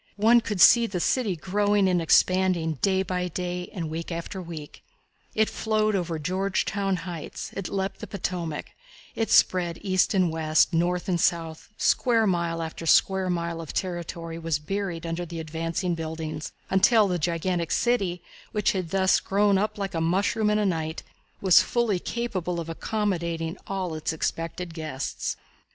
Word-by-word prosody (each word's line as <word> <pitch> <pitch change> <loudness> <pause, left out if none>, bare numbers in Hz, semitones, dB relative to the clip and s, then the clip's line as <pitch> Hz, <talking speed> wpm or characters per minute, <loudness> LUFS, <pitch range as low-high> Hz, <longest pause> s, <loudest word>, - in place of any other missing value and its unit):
One 230 +3 +5
could 210 -4 -4
see 235 +6 +7
the 190 -4 -3
city 215 0 +1
growing 205 +3 +1
and 180 -2 +2
expanding 170 -2 +3
day 190 -1 +2
by 180 -1 -2
day 180 +1 -4
and 170 -4 -4
week 165 +2 -5
after 170 +3 -5
week. 165 -4 -9 0.5
It 220 0 +3
flowed 215 -1 0
over 170 -3 -1
Georgetown 195 +3 -1
Heights; 170 -4 -6
it 195 -2 -4
leaped 195 0 -2
the 215 - -7
Potomac; 175 -5 -4 0.4
it 225 - -1
spread 175 -2 +3
east 185 +1 +2
and 180 -3 +3
west, 155 -1 +3
south 175 +3 0
and 175 -3 +4
north; 165 -2 -8
square 230 -3 +3
mile 170 -3 0
after 165 +1 -6
square 190 +2 +4
mile 170 -1 -2
of 160 - -8
territory 170 -2 -4
was 165 -2 0
buried 170 +1 -4
under 165 +1 -3
the 170 -1 -6
advancing 165 +3 -2
buildings, 160 -2 -5 0.2
until 205 +3 +5
the 180 -2 -1
gigantic 170 +1 -1
city, 195 -8 0 0.3
which 210 -2 +2
had 185 -4 -3
thus 190 +1 +3
grown 200 0 +2
up 215 +2 -1
like 195 -1 -3
a 165 - -1
mushroom 200 +6 +1
in 210 - +2
a 210 - +1
night, 160 -3 -2 0.4
was 190 -3 +7
fully 235 -6 0
capable 185 -7 -3
of 165 -1 -5
accommodating 170 -3 -2
all 190 -3 -3
its 155 +1 -2
expected 165 +2 -3
guests. 155 -4 -4
180 Hz, 160 wpm, -26 LUFS, 165-195 Hz, 0.5 s, see